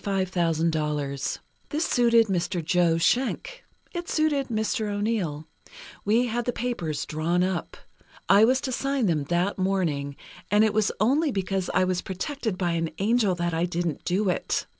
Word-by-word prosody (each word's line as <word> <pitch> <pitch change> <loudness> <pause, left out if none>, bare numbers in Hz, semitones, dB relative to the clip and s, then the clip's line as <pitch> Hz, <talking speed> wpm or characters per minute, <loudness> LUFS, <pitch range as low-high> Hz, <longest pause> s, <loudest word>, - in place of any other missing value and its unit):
This 160 -7 0 0.6
suited 235 -2 +4
Mr. 175 -3 -2
Joe 170 -1 +3
Schenck. 265 - 0 0.3
It 345 -1 -5
suited 295 -4 +1
Mr. 220 -1 -1
O'Neill. 205 -8 -2 0.6
We 225 +4 +3
had 240 0 -2
the 245 - +1
papers 225 -12 -3
drawn 165 +3 0
up. 185 -2 -3 0.5
I 200 +2 +6
was 255 +3 +4
to 265 - -3
sign 275 0 0
them 155 -6 +1
that 175 +6 0
morning, 165 -8 0 0.3
and 210 +2 +4
it 215 -2 +2
was 215 -1 +2
only 280 +8 +2
because 195 -2 -2
I - - +4
was 185 -1 0
protected 220 - -4
by 175 -2 0
an 165 -1 -1
angel 210 -2 +2
that 175 -1 -2
I 165 +2 +1
didn't 170 -3 -3
do 195 +3 0
it. 180 - -1
190 Hz, 155 wpm, -26 LUFS, 170-230 Hz, 0.6 s, I